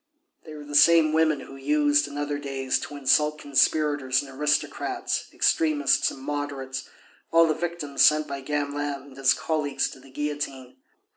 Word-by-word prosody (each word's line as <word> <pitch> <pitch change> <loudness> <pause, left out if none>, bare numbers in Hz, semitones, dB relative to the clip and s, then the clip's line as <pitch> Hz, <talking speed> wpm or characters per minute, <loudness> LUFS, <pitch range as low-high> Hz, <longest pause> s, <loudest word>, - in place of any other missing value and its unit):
They 155 -1 -10
were 150 - -9
the 145 0 -10
same 160 +1 +5
women 155 -3 +2
who 135 - -11
used 145 +1 +2
in 145 0 -9
other 145 0 -3
days 135 -2 -2
to 145 - -8
insult 150 +2 +2
conspirators 145 -2 +1
and 135 - -11
aristocrats, 150 +2 -1
extremists 150 -3 +2
and 135 - -10
moderates, 135 -2 -5 0.4
all 165 0 +6
the 155 - +1
victims 160 -3 -4
sent 155 0 +4
by 140 -1 -6
Gamelin 145 0 -2
and 140 -2 -15
his 135 0 +3
colleagues 150 -3 -2
to - - -12
the 135 +1 -17
guillotine. 140 -2 -5
145 Hz, 160 wpm, -25 LUFS, 135-150 Hz, 0.4 s, all